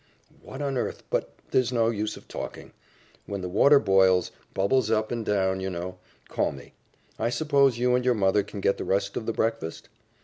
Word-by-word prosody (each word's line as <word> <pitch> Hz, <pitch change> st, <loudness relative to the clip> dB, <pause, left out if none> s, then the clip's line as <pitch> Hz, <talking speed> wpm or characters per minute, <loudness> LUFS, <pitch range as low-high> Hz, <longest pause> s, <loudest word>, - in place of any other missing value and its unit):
"What 135 Hz, +2 st, -7 dB
on 135 Hz, -2 st, -1 dB
earth -, -, -4 dB
but -, -, 0 dB, 0.2 s
there's 130 Hz, -2 st, +2 dB
no 115 Hz, -2 st, +2 dB
use 105 Hz, -1 st, -3 dB
of -, -, -15 dB
talking. -, -, -7 dB, 0.5 s
When 100 Hz, -1 st, -4 dB
the 90 Hz, -, -3 dB
water 140 Hz, +11 st, +5 dB
boils 95 Hz, -5 st, +3 dB, 0.2 s
bubbles 110 Hz, +4 st, +2 dB
up 110 Hz, -1 st, +1 dB
and 120 Hz, -1 st, -2 dB
down, 95 Hz, -2 st, +1 dB
you 95 Hz, 0 st, -3 dB
know 90 Hz, +1 st, -6 dB, 0.3 s
call -, -, 0 dB
me. 70 Hz, -, -12 dB, 0.5 s
I 115 Hz, -, +1 dB
suppose 140 Hz, -1 st, +2 dB
you 125 Hz, +1 st, +2 dB
and 125 Hz, 0 st, +2 dB
your 125 Hz, -1 st, +3 dB
mother 100 Hz, 0 st, +3 dB
can 100 Hz, 0 st, -8 dB
get 100 Hz, -, +2 dB
the -, -, -2 dB
rest 100 Hz, +1 st, 0 dB
of 110 Hz, -, -4 dB
the -, -, +1 dB
breakfast? 110 Hz, -8 st, -2 dB
110 Hz, 200 wpm, -26 LUFS, 95-125 Hz, 0.5 s, water